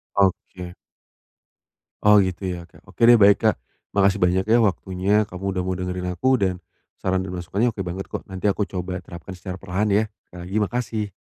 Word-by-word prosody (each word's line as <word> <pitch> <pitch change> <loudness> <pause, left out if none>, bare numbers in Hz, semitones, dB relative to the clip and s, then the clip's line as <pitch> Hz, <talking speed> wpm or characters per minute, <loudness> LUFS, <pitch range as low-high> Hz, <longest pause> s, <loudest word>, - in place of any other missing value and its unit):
Oke. 90 -2 0 1.3
Oh, 105 0 +7
gitu 95 +1 -3
ya, 90 -1 -5
Kak. 85 - -19
Oke - - 0
deh, 120 -1 +7
baik, 100 +2 +5
Kak. 110 - +4 0.4
Makasih 100 0 +3
banyak 95 +2 +2
ya 115 +2 +5
waktunya, 100 +2 +1
kamu 95 -2 -8
udah 90 -1 -1
mau 95 0 -1
dengerin 90 0 -3
aku 130 +5 +2
dan 95 -2 +1 0.4
saran 95 0 0
dan 95 -1 -5
masukannya 95 +7 0
oke - - -7
banget 90 +2 -5
kok. - - -5
Nanti 95 +1 -2
aku 100 +1 +1
coba 90 -1 -5
terapkan 85 +3 -9
secara 90 0 -7
perlahan, 100 +3 -1
ya. 105 +2 +3 0.2
Sekali 90 - -12
lagi, 100 - -4
makasih. 110 -2 -3
95 Hz, 185 wpm, -23 LUFS, 90-105 Hz, 1.3 s, Oh